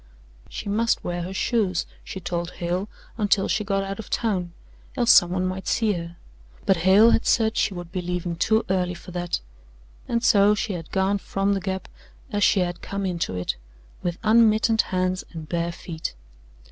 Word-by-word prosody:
She - - -6
must 225 +3 +1
wear 175 0 -3
her 180 +2 -5
shoes, 190 -2 0 0.2
she 190 - -7
told 175 -1 -3
Hale, 180 +4 -2 0.3
until 205 -2 +2
she 215 - 0
got 195 -1 0
out 195 +1 -5
of 220 - -8
town, 190 -7 -1 0.5
else 240 -2 +5
someone 180 +1 +5
might 185 +1 -4
see 220 -3 +2
her, 170 -1 -6 0.5
but 190 - +4
Hale 195 +7 +6
had - - +1
said 220 -1 +3
she 195 - +1
would 175 -1 -7
be 185 - -2
leaving 175 -1 -3
too 220 +6 +2
early 180 -1 0
for 180 - -11
that: 175 -1 -2 0.7
and 235 0 0
so 205 -1 +5
she 210 -1 -2
had 165 -3 -6
gone 195 +1 +1
from 195 +1 0
the 195 - -1
Gap 190 0 -3 0.4
as 205 -1 +1
she 195 - +4
had 175 -1 -2
come 200 0 -4
into 170 - -2
it, 90 -7 -2 0.4
with 175 -1 -2
unmittened 220 0 +4
hands 185 0 -1
and 160 -2 -7
bare 170 0 -1
feet. 160 - -6
190 Hz, 185 wpm, -24 LUFS, 175-210 Hz, 0.7 s, Hale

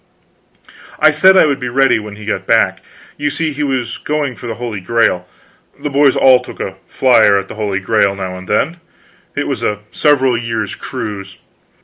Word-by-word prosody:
I 155 0 +6
said 190 +6 +5
I - - +6
would 140 -3 0
be 125 - -4
ready 135 -1 +3
when 105 -1 -9
he 105 0 -11
got 95 -3 -3
back. 95 -4 +2 0.4
You 145 - -1
see, 155 +1 -2
he 145 - -5
was 130 -4 -2
going 145 -4 -2
for 120 - -9
the 115 - -4
Holy 115 -3 -5
Grail. 95 -3 0 0.5
The 150 - -4
boys 140 0 +4
all 130 -1 +6
took - - -11
a 95 0 -5
flier 115 -6 +4
at 100 -1 -3
the - - -8
Holy 105 -3 -2
Grail 100 0 +1
now 95 -1 -5
and 90 0 -10
then. 155 +11 0 0.6
It - - -2
was - - -3
a 105 0 -2
several 135 -4 +2
years' 115 -3 -3
cruise. 100 -2 -7
115 Hz, 195 wpm, -16 LUFS, 100-140 Hz, 0.6 s, I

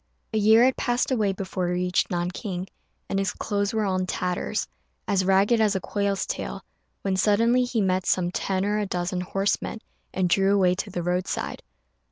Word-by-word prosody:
A 220 - +2
year 220 +3 +6
had 260 0 +3
passed 240 +2 0
away 215 -6 +2
before 190 -1 -3
he 175 - 0
reached 180 0 +1
Nanking, 180 +1 -3 0.4
and 195 - -1
his 195 - -1
clothes 205 -1 -1
were 220 -1 0
all 190 -1 0
in 185 - -2
tatters 180 0 -2 0.4
as 195 -2 +2
ragged 195 +5 +3
as 210 -2 +3
a - - +1
quail's 200 0 -1
tail, - - -5 0.4
when 195 -1 0
suddenly 230 +6 +3
he 245 -3 -1
met 185 -1 0
some 175 -1 +2
ten 190 +1 -1
or 210 +1 +1
a 205 - -1
dozen 180 0 -2
horsemen, 195 +4 -1 0.3
and 185 -1 0
drew 195 +3 +3
away 185 -2 +4
to 195 +3 -4
the 175 -2 -4
roadside. 180 +1 -2
195 Hz, 190 wpm, -25 LUFS, 185-210 Hz, 0.4 s, year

